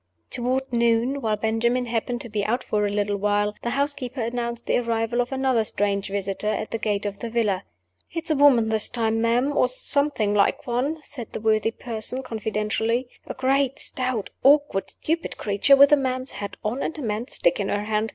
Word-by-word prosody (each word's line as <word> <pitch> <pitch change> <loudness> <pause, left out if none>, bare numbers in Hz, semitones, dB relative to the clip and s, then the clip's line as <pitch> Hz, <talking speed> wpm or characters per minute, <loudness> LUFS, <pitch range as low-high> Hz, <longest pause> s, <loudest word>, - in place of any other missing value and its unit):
Toward 255 +2 -1
noon 235 +3 +2
(while 220 -3 +1
Benjamin 230 +3 0
happened 240 +1 -2
to 240 - -7
be 210 -1 -1
out 240 +5 0
for 210 -1 0
a - - -3
little 205 0 0
while) 205 +1 +1
the 235 - -2
housekeeper 275 -1 -2
announced 235 0 -3
the - - +2
arrival 230 0 0
of 245 - -4
another 265 -3 +1
strange 200 -2 -1
visitor 200 +1 -3
at 215 0 -2
the 225 - -2
gate 210 -2 -1
of 200 -1 -4
the 235 - -4
villa. 220 -5 0 0.5
"It's 330 -1 -3
a - - +3
woman 265 -6 +5
this 220 -1 +3
time, 225 -2 0
ma'am 245 +5 +1
or - - +4
something 255 -4 +1
like 200 -1 +2
one," 265 +6 -1
said 240 -6 -8
this 215 - -5
worthy 220 0 +3
person, 230 +2 -3
confidentially. 225 +1 -1 0.2
"A - - -5
great, 270 0 +1
stout, 255 -5 -2
awkward, 285 -7 +3
stupid 330 +1 -3
creature, 205 +7 +4
with 280 +1 +7
a 295 - +7
man's 255 -1 -2
hat 200 -1 -6
on 235 +6 -2
and 320 - -3
a 300 - -5
man's 220 +3 -3
stick 175 - +2
in 200 - -1
her 205 0 -1
hand. 215 +1 -1
235 Hz, 200 wpm, -24 LUFS, 215-260 Hz, 0.5 s, with